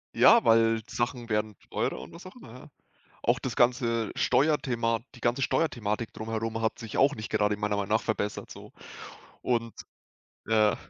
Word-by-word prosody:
Ja, 235 -1 +7
weil 115 0 +4
Sachen 120 -1 -3
werden 105 -1 -1
teurer - - -2
und - - -11
was 170 +2 -12
auch 185 - -11
immer, 130 - -13
ja. 125 - -13 0.5
Auch 120 +2 +2
das 130 - -4
ganze 120 -3 +2
Steuerthema, 125 -3 +1
die 120 - -14
ganze 120 +4 0
Steuerthematik 115 -7 -1
drumherum 115 0 -4
hat 110 - -1
sich 115 -2 -7
auch 140 +2 +4
nicht 110 -1 -7
gerade 105 -1 +1
meiner 105 0 -1
Meinung 100 0 -3
nach 110 - +2
verbessert 105 -2 -3
so, - - -11 0.7
und, 115 -2 -1 0.7
äh 110 -2 +3
115 Hz, 165 wpm, -28 LUFS, 110-125 Hz, 0.7 s, Ja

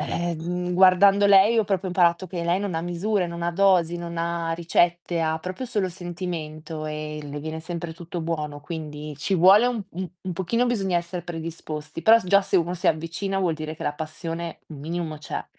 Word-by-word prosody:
ehm, 175 +1 -2
guardando 190 +2 +6
lei 200 +3 +6
ho 220 - +3
proprio 190 -1 -1
imparato 180 0 +2
che 175 -2 -4
lei 175 +3 +1
non 200 -4 -3
ha - - 0
misure, 175 +3 -1
non 170 0 -6
ha 170 - +1
dosi, 175 -2 +3
non 170 0 -6
ha 170 0 -1
ricette, 170 +1 +1
ha 160 -1 +1
proprio 185 +9 -5
solo 210 -6 -1
sentimento 170 -3 -6
e 150 0 -5
le 145 0 -6
viene 160 +1 -5
sempre 170 0 -5
tutto 170 +1 -6
buono, 150 -3 -3
quindi 150 -2 -6
ci 190 +6 0
vuole 190 +6 +7
un 240 -3 -1
un 185 +1 -5 0.2
un - - -1
pochino 190 +8 0
bisogna 195 -7 0
essere 175 +1 -3
predisposti, 160 -2 -6
però 225 +6 +7
s - - -11
già 200 +2 +5
se 190 - +1
uno 175 +1 +1
si 180 +2 -3
avvicina, 165 +5 0
vuol 175 -4 +1
dire 155 0 -5
che - - -9
la 145 - -1
passione 165 +2 -5
un 155 - -9
minimo 160 +1 -4
c'è. 150 - -5
170 Hz, 200 wpm, -24 LUFS, 160-185 Hz, 0.2 s, vuole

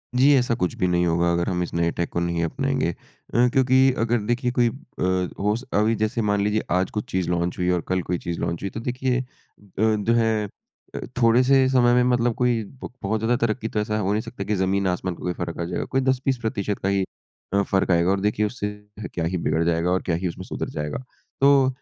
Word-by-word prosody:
जी 135 +3 +5
ऐसा 125 -2 +1
कुछ 90 -7 -1
भी 90 - +1
नहीं 90 0 +2
होगा 85 +1 +2
अगर 85 0 0
हम 90 -1 0
इस 85 - -7
नए 85 0 +1
टेक 85 - -3
को - - -2
नहीं 85 -1 -1
अपनाएँगे। 135 +5 0 0.4
अ, 120 +1 +4
क्योंकि 130 0 +4
अगर 115 +1 +1
देखिए 120 +2 0
कोई 120 -1 +3
अ, - - -8 0.7
हो 105 +2 +1 0.2
अभी 110 +2 +2
जैसे 110 +2 -1
मान 105 -1 +1
लीजिए 105 +1 +1
आज 90 +1 +2
कुछ 105 - -4
चीज़ 95 -2 -1
लॉन्च 85 0 -1
हुई 90 0 0
और 90 -2 +1
कल 95 0 0
कोई 90 +1 -2
चीज़ 85 0 -5
लॉन्च 85 -1 -2
हुई, 100 - -1
तो 115 - -6
देखिए 125 +1 -1
अ, - - -9 0.5
जो 110 +1 +2
है 110 -2 +2 0.5
अ, - - -3 0.2
थोड़े 115 +2 +5
से 135 0 +4
समय 120 -2 +4
में 125 - +4
मतलब 120 0 +1
कोई 120 -2 +1
ब 130 +6 -10
बहुत 110 +3 0
ज़्यादा 115 +3 +1
तरक्की 110 0 -2
तो 105 - -1
ऐसा 105 0 -1
हो 100 0 0
नहीं 105 - 0
सकता 120 - -7
कि 105 - -1
ज़मीन 95 +1 +1
आसमान 90 0 -2
का - - -18
कोई 90 - -1
फ़र्क़ 85 -1 -5
आ - - -1
जाएगा। 90 - -3
कोई 135 - 0
10-20% 130 0 +1
प्रतिशत 105 -2 -2
का 100 - +1
ही 100 -1 +2 0.5
अ, 100 - +4
फ़र्क़ 95 -1 +1
आएगा 85 +2 +3
और 100 - +1
देखिए 105 +1 +1
उससे 105 -1 -3 0.4
क्या 85 - -1
ही 90 +2 -1
बिगड़ 80 0 0
जाएगा 85 +1 +1
और 95 - +1
क्या 85 - 0
ही 90 +2 -2
उसमें 90 +2 -6
सुधर - - -4
जाएगा। 75 - -4 0.4
तो 140 -1 +6
105 Hz, 240 wpm, -24 LUFS, 90-120 Hz, 0.7 s, तो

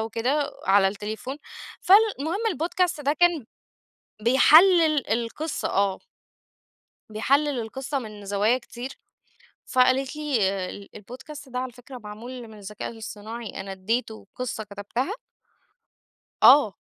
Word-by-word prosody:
وكده 255 +6 -1
على 195 0 +5
التليفون." 215 +6 -6 0.4
فالمهم 390 -5 +3 0.2
الPodcast 340 -1 -1
ده 285 +1 +2
كان 335 -6 +2 0.8
بيحلل 310 - +5
القصة، 235 +7 -2
آه. 195 -1 +1 1.1
بيحلل 275 +6 +1
القصة 265 +5 -4
من 210 -4 -9
زوايا 205 +5 +2
كتير، 245 0 -8 0.8
فقالت 260 +2 +2
لي: 300 -4 -1 0.6
"الPodcast 265 +6 -11
ده 250 - -3
على 255 0 -4
فكرة 250 +2 -11
معمول 235 +3 -9
من 215 - -13
الذكاء 205 +1 -7
الاصطناعي، 225 0 -8
أنا 195 0 -6
ادّيته 220 +3 -3
قصة 250 -3 -4
كتبتها" 210 - -4 1.3
آه، 250 -8 +7
245 Hz, 105 wpm, -25 LUFS, 215-290 Hz, 1.3 s, آه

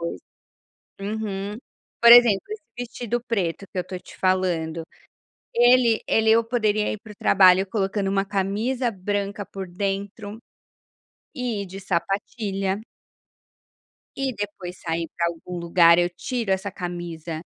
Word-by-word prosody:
qualquer - - -14
coisa, - - -40 1.0
uhum. 200 +1 -4 0.4
Por 235 - +9
exemplo, 235 -5 +8
esse 430 -5 -7
vestido 240 -1 -3
preto 195 -4 -1
que - - -8
eu - - +2
estou 180 +1 -7
te - - -15
falando, 170 -4 0 0.7
ele 240 -1 +5
ele 220 0 +3
eu 230 +1 +5
poderia 215 -3 +1
ir - - -5
para 215 - -12
o - - -18
trabalho 190 -1 +5
colocando 195 -1 -1
uma 195 0 +1
camisa 210 +6 -1
branca 200 +1 -3
por 190 -2 -7
dentro 200 +3 -4 1.0
e 240 -7 -2
de 190 +1 -9
sapatilha. 195 +2 -2 1.3
E 270 -2 -2
depois, 195 -3 -6
sair 165 0 -2
para 170 -1 +1
algum 170 +1 -6
lugar, 170 0 +5
eu 175 0 +2
tiro 230 +3 -3
essa 190 +1 -1
camisa 175 -3 -6
195 Hz, 135 wpm, -24 LUFS, 180-220 Hz, 1.3 s, Por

